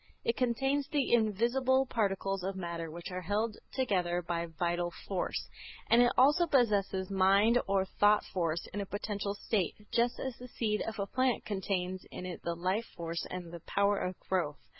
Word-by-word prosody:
It 230 - +1
contains 270 +3 +1
the 285 -5 0
invisible 240 +4 +3
particles 195 -5 -1
of 195 +1 -2
matter 170 -3 -4
which 170 +3 -7
are 180 0 -3
held 210 +4 -1 0.2
together 180 -9 0
by 170 0 -2
vital 175 +2 -1 0.2
force, 190 -3 -2 0.4
and 235 +1 +7
it 245 - +5
also 295 +7 +5
possesses 200 - +2
mind 195 +5 +4
or 195 -1 +2
thought 205 +2 +3
force 170 -2 -1
in 205 - -2
a - - -3
potential 205 0 -3
state, 200 -3 -1 0.2
just 235 +1 +1
as 260 -3 -4
the 250 - -8
seed 215 -3 -1
of 220 - -4
a 200 - -1
plant 255 +3 0
contains 185 -2 -2
in 180 - -7
it 180 -1 -6
the 170 - -2
life 185 +6 0
force 170 0 -3
and 180 -2 -6
the 170 - -6
power 200 0 +2
of 180 0 -3
growth. 170 -6 -1
200 Hz, 180 wpm, -32 LUFS, 180-235 Hz, 0.4 s, and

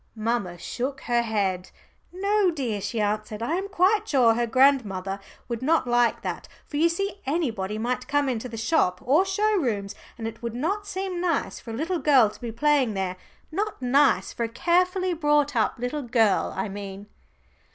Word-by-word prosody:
Mamma 215 -5 -2
shook 265 +9 -4
her 240 -1 +1
head. 200 -5 -1 0.4
"No, 395 +2 +2
dear," 250 - -2
she 205 +3 -3
answered. 215 +1 -2
"I 295 - -1
am 380 +3 -1
quite 400 +3 +2
sure 245 -5 +5
her 235 +1 0
grandmother 225 -7 +2 0.3
would 235 -2 -4
not 315 +3 +2
like 240 -1 +2
that. - - -4 0.2
For 290 - -5
you 330 +3 +4
see 395 +3 -3
anybody 225 - -1
might 250 +3 -2
come 290 -1 +1
into 250 -1 -2
the 225 - -7
shop 220 - +1
or 300 +9 +4
show 420 +2 +1
rooms, 210 - -1 0.2
and 225 -1 -4
it 225 0 -8
would 235 -1 -4
not 395 +11 -2
seem 375 -3 -3
nice 340 -5 -1
for - - -12
a 225 - -4
little 335 +5 -1
girl 260 -9 +5
to - - -16
be 235 -2 -4
playing 265 -2 +2
there 190 -1 -2 0.4
not 410 +5 -2
nice 270 +3 +3
for 235 - -3
a - - -5
carefully 365 - +1
brought 295 -3 +2
up 220 -3 +1
little 245 +5 -3
girl, 230 -5 +2
I 190 - -1
mean." 200 0 -7
250 Hz, 185 wpm, -25 LUFS, 220-330 Hz, 0.4 s, sure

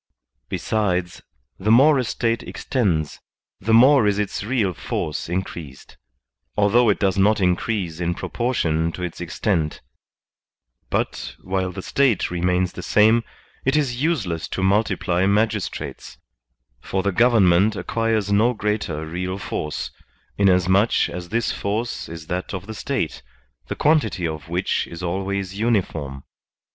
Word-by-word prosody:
Besides, 90 -5 -1 0.4
the 105 - -1
more 135 +5 +6
a - - +1
State 115 0 -1
extends, 85 - -1 0.4
the 110 - -2
more 125 +1 +6
is 100 -1 +2
its 105 -1 -2
real 105 -5 0
force 75 -1 -4
increased, 85 -6 -5 0.6
although 110 +3 +4
it 100 - +3
does 100 -1 +1
not 105 +3 +4
increase 90 -2 0
in 85 0 -1
proportion 85 -12 -1
to 90 - -6
its 90 0 -5
extent; 85 -2 -1 1.1
but, - - -2
while 95 0 -1
the 95 +1 -7
State 135 -10 +1
remains 90 +1 +1
the - - -7
same, 110 +2 +4 0.4
it 135 +2 +2
is 130 -5 0
useless 95 - -1
to 95 - -3
multiply 95 -2 +2
magistrates, 105 0 -1 0.6
for 95 +9 -2
the 100 - +1
government 105 -3 +4
acquires 110 -2 -1
no 115 +4 +3
greater 105 -8 -2
real 90 +4 -3
force, 75 -5 -4 0.4
inasmuch 95 +2 +3
as 85 0 -7
this 115 0 0
force 110 +4 -3
is 80 -1 -8
that 90 +3 -3
of 95 0 -6
the 110 - -7
State, - - -3 0.5
the - - -3
quantity 110 - +2
of 80 0 -6
which 90 +2 0
is 85 +1 -8
always 95 +2 -3
uniform. 80 - -1
100 Hz, 135 wpm, -22 LUFS, 90-110 Hz, 1.1 s, more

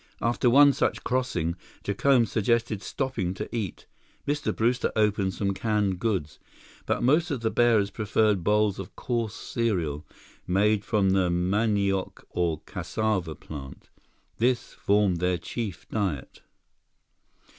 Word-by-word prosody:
After 120 +2 +2
one 140 +3 +7
such - - -1
crossing, 110 -11 -1 0.3
Jacome 120 +4 +3
suggested 110 0 0
stopping 105 -11 -2
to - - -4
eat. 105 -6 -4 0.4
Mr. 145 0 0
Brewster 120 +2 +1
opened 105 -3 +1
some 100 -1 0
canned 100 -2 0
goods, 95 -10 -2 0.5
but - - 0
most 155 +8 +3
of 135 -6 -2
the 110 -1 0
bearers 110 -5 +3
preferred 105 -3 +1
bowls 105 0 +2
of 95 0 -8
coarse 115 -3 -2
cereal, 85 -11 -2 0.4
made 105 +3 +2
from 100 -2 +2
the 95 -2 +2
manioc 100 +2 0
or 85 -3 -1
cassava 95 -8 -2
plant. 70 -3 -10 0.5
This 120 +1 0
formed 100 -3 +2
their 90 0 +1
chief 95 +4 -5
diet. 95 -11 -3
105 Hz, 125 wpm, -27 LUFS, 95-115 Hz, 0.5 s, one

